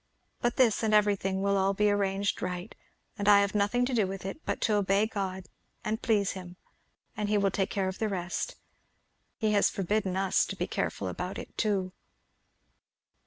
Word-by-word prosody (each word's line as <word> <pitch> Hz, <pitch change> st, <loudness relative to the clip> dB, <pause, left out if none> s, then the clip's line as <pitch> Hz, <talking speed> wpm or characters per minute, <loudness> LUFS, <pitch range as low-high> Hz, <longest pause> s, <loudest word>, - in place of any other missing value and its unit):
But 240 Hz, -, +1 dB
this 240 Hz, -5 st, +3 dB
and 215 Hz, -1 st, +2 dB
everything 195 Hz, -2 st, +2 dB
will 200 Hz, 0 st, +2 dB
all 195 Hz, +1 st, +2 dB
be 210 Hz, +1 st, +3 dB
arranged 200 Hz, 0 st, 0 dB
right, 180 Hz, +3 st, -4 dB, 0.5 s
and 205 Hz, 0 st, +2 dB
I 200 Hz, -1 st, +8 dB
have 200 Hz, 0 st, 0 dB
nothing 210 Hz, +4 st, +2 dB
to 255 Hz, -, -2 dB
do 215 Hz, -5 st, +2 dB
with 190 Hz, 0 st, -6 dB
it 195 Hz, +11 st, -6 dB
but -, -, -1 dB
to 220 Hz, -, +2 dB
obey 200 Hz, +1 st, +2 dB
God 190 Hz, -4 st, -4 dB, 0.4 s
and 220 Hz, +1 st, -2 dB
please 210 Hz, -4 st, +2 dB
him, 180 Hz, -2 st, -8 dB, 0.6 s
and 210 Hz, -1 st, -2 dB
he 210 Hz, -, +3 dB
will 200 Hz, -1 st, +2 dB
take 195 Hz, 0 st, 0 dB
care 195 Hz, -2 st, -1 dB
of 190 Hz, -, -5 dB
the 220 Hz, -, 0 dB
rest. 180 Hz, -2 st, -3 dB, 0.8 s
He 215 Hz, -2 st, +1 dB
has 205 Hz, -1 st, +4 dB
forbidden 195 Hz, 0 st, -1 dB
us 195 Hz, -1 st, +2 dB
to -, -, -5 dB
be -, -, -2 dB
careful -, -, -2 dB
about -, -, -4 dB
it -, -, -9 dB
too." 195 Hz, -4 st, 0 dB
200 Hz, 190 wpm, -29 LUFS, 190-210 Hz, 0.8 s, I